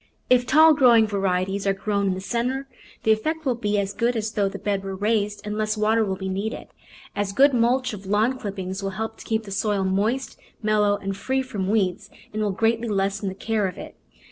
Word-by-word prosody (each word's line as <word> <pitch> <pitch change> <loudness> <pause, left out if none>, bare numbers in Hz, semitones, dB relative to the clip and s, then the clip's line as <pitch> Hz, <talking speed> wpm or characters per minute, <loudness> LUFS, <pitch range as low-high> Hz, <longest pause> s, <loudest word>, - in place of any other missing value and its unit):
If 245 -1 +4
tall 315 +2 +7
growing 245 -6 +6
varieties 195 -1 -1
are 195 - +2
grown 200 0 -1
in 190 - +1
the 190 - -6
centre 250 +6 -2 0.4
the 220 - +4
effect 315 +9 0
will 260 - +2
be 210 -3 -1
as 200 0 -1
good 240 +1 0
as 220 -1 -2
though 205 -2 +1
the - - -7
bed 200 -2 -2
were 195 0 -4
raised 205 +1 0
and 210 0 -3
less 215 0 -1
water 220 +1 +2
will 190 -3 -1
be 190 0 -5
needed. 200 +4 -4 0.5
A 205 - +1
good 265 +9 +4
mulch 250 +1 +2
of 200 -2 -9
lawn 220 +6 +1
clippings 190 -2 -5
will 195 - -2
help 220 0 -4
to - - -11
keep 220 0 -1
the 200 - -10
soil 200 0 0
moist, 210 +8 -1 0.2
mellow, 210 -1 +2
and 195 -1 -4
free 265 +6 -1
from 205 -7 -3
weeds 200 -1 0 0.2
and 215 - -2
will 210 - +1
greatly 225 +4 +1
lessen 200 -1 -1
the 190 - -7
care 215 0 0
of 180 - -7
it. - - -9
210 Hz, 220 wpm, -24 LUFS, 195-230 Hz, 0.5 s, tall